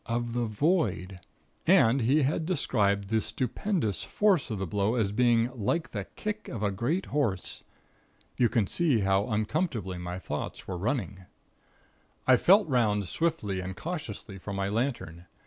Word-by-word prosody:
of 120 0 -2
the 120 0 0
void. 105 - 0 0.5
And 120 +4 +5
he 135 +6 +3
had 155 +4 0
described 100 - +1
the 110 0 +2
stupendous 130 - -2
force 200 -10 +2
of 110 - -3
the 95 - -2
blow 100 +6 0
as 110 -5 +1
being 120 +1 +3
'like 145 +9 -1
the 100 -3 -4
kick 210 0 -4
of 110 -4 -5
a 100 - +1
great 135 - -1
horse.' 115 -11 -1 0.7
You 120 -2 +3
can 115 -3 +2
see 140 - +1
how 95 +1 +2
uncomfortably 110 - -1
my 90 0 -5
thoughts 95 - -5
were 95 - -3
running. 100 -2 -2 1.0
"I 130 - +7
felt 195 - +5
'round 105 -7 +1
swiftly 150 - -1
and 95 0 -5
cautiously 115 - -6
for 100 +2 -6
my 100 0 -1
lantern. 105 -7 -3
115 Hz, 155 wpm, -28 LUFS, 100-140 Hz, 1.0 s, I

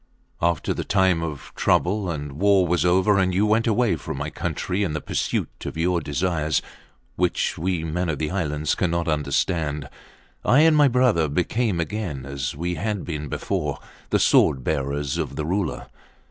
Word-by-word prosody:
After 85 0 +1
the - - -3
time 95 -4 +2
of 75 -4 -6
trouble 95 +1 +1
and 75 -3 -4
war 95 +5 +3
was 90 0 +1
over 95 +3 +3
and 95 -1 +1
you 100 +3 +3
went 110 +2 +2
away 110 -4 +2
from - - -6
my 75 +2 -4
country 95 +3 -2
in 90 -7 0
the 75 - -2
pursuit - - -3
of - - -6
your 85 +1 +1
desires, 80 0 0 0.6
which 90 0 0
we, 90 0 -1
men 85 +2 -2
of 75 - -1
the 75 +1 -2
islands, 75 -5 -1
cannot 85 -2 0
understand, 75 0 0 0.6
I 135 +4 +5
and 160 0 +5
my 145 -1 +6
brother 120 - +3
became 90 +5 0
again, 85 -7 -3
as 70 -3 -4
we 85 +4 -2
had 105 -2 -2
been 75 -3 -4
before, - - -2 0.3
the - - +3
sword 65 - +4
bearers 70 +1 -1
of - - -3
the 75 - -3
Ruler. 95 +3 -2
85 Hz, 175 wpm, -23 LUFS, 75-100 Hz, 0.6 s, my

